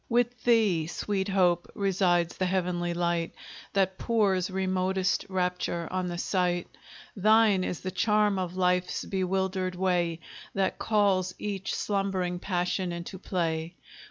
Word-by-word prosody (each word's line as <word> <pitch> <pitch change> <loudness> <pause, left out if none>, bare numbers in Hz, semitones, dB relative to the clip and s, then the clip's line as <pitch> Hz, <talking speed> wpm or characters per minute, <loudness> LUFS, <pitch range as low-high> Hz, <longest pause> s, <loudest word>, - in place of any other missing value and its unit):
With 240 -1 0
thee, 210 -9 +3
sweet 190 +2 -2
Hope, 180 -3 +2
resides 180 -4 +1
the 185 - 0
heavenly 180 -2 0
light 170 -1 -1 0.4
That 190 -1 +1
pours 200 -6 +1
remotest 190 0 0
rapture 180 -2 -1
on 185 0 -1
the 175 -1 -4
sight; 175 -1 -1 0.4
Thine 215 -1 +4
is 180 - -3
the 185 - -4
charm 210 0 +2
of 180 0 -4
life's 180 0 +1
bewildered 190 -1 -1
way, 175 -3 0 0.4
That 195 -1 0
calls 195 -4 +2
each 200 -2 -3
slumbering 190 -3 -1
passion 180 0 -1
into 170 +2 -6
play. 165 -3 -2
185 Hz, 130 wpm, -28 LUFS, 175-195 Hz, 0.4 s, Thine